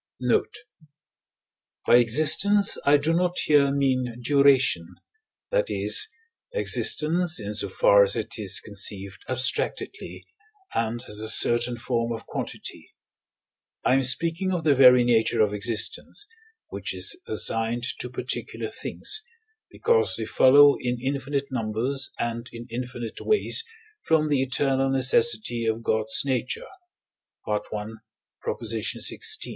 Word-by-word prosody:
Note. 125 - -1 1.3
By 120 - +5
existence 155 - +4
I 145 +1 +6
do 155 +3 -1
not 180 +1 -1
here 145 -2 +3
mean 130 -4 -1
duration 130 - +2 0.6
that - - 0
is, 430 - +2 0.5
existence 175 - +2
in 105 0 -6
so 100 -1 -1
far 100 +2 +4
as 100 0 +2
it 115 +1 -5
is 100 -3 +1
conceived 100 0 -3
abstractedly, 130 +1 -1 0.5
and 115 +1 -2
as 105 - -1
a 110 0 0
certain 120 +2 +4
form 120 0 -3
of 115 - -9
quantity. - - -7 1.0
I - - +3
am 135 - +3
speaking 165 +8 0
of 175 -3 -3
the 150 -2 +3
very 125 -2 +6
nature 115 -1 +1
of 105 -1 +2
existence, 110 - -1 0.4
which - - -5
is - - +2
assigned 115 +1 +1 0.2
to 125 - -6
particular 125 - -5
things, 435 +1 -2 0.5
because 465 -1 +1
they - - -5
follow 145 +2 +5
in 125 -1 -3
infinite 140 +1 -4
numbers 125 +3 -2
and 120 0 -5
in 115 0 -10
infinite 120 -1 -7
ways 430 +1 +1 0.4
from 155 -1 0
the 140 -3 +1
eternal 135 0 0
necessity 120 -3 +1
of 110 +1 -2
God's 110 0 0
nature 130 -2 -3 0.8
(I. 105 0 0
xvi.). 105 +2 -8
125 Hz, 125 wpm, -24 LUFS, 115-145 Hz, 1.3 s, I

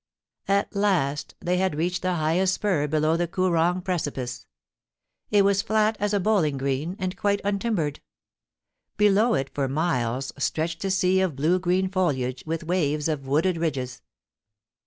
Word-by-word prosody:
At 200 +2 +1
last 175 -9 0
they 180 +1 0
had 185 -3 0
reached 175 +4 -1
the 185 -1 0
highest 175 +4 +1
spur 175 -8 0
below 155 +2 +1
the 175 +1 0
Koo 185 +2 0
rong 175 +2 +1
precipice. 145 -9 -3 0.8
It 205 -1 +4
was 200 0 +3
flat 215 0 +1
as 205 0 0
a 205 - +2
bowling 180 -8 +1
green, 140 +6 -2
and 185 -1 -3
quite 200 0 +1
untimbered. 200 -7 -1 1.0
Below 210 +2 +4
it, 135 0 -2
for 140 -2 -1
miles, 135 -4 -1
stretched 165 +4 -2
a - - 0
sea 185 0 +2
of 185 -6 0
blue 160 +7 +2
green 185 +1 +1
foliage, 135 -10 -1
with 165 +1 -2
waves 155 -3 0
of 145 -4 -3
wooded 165 +6 +1
ridges. 135 -7 -3
175 Hz, 155 wpm, -25 LUFS, 150-190 Hz, 1.0 s, It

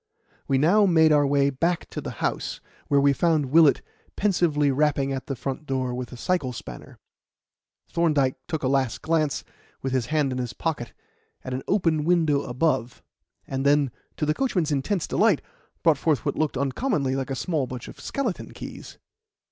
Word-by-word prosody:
We 135 - +2
now 190 +9 +4
made 160 -3 +5
our 145 -1 +4
way 140 0 +3
back 170 +6 -1
to - - -4
the - - -5 0.2
house, - - -2 0.3
where 140 - +3
we 140 0 +4
found 150 -3 +1
Willett 160 -2 +5 0.3
pensively 165 -8 +2
rapping 140 -1 +1
at 135 -1 -5
the 135 - -2
front 135 +4 -5
door 130 -2 -1
with 125 0 -5
a 125 - -9
cycle 140 -3 -1
spanner. 60 - -9 0.9
Thorndyke 150 -6 +2
took 160 -3 -3
a - - +2
last 130 -2 0
glance, 160 -3 0 0.4
with 135 -1 -2
his 130 -3 0
hand 150 -3 +1
in 130 - -3
his 125 -2 -3
pocket, 150 -8 -3 0.5
at 130 - -5
an 130 - -2
open 165 -6 +2
window 160 -4 +2
above, 125 -2 -1 0.4
and 135 0 -3
then, 140 -2 +3 0.3
to 150 - 0
the 150 - +2
coachman's 180 - 0
intense 150 +6 0
delight, 205 -7 +3 0.4
brought 160 -4 +4
forth 155 -3 +1
what - - 0
looked 155 -4 -1
uncommonly 140 - 0
like 135 0 -3
a 135 - -2
small 150 -2 -1
bunch 125 -2 -7
of - - -11
skeleton 245 -9 -3
keys. - - -9
145 Hz, 180 wpm, -25 LUFS, 135-165 Hz, 0.9 s, made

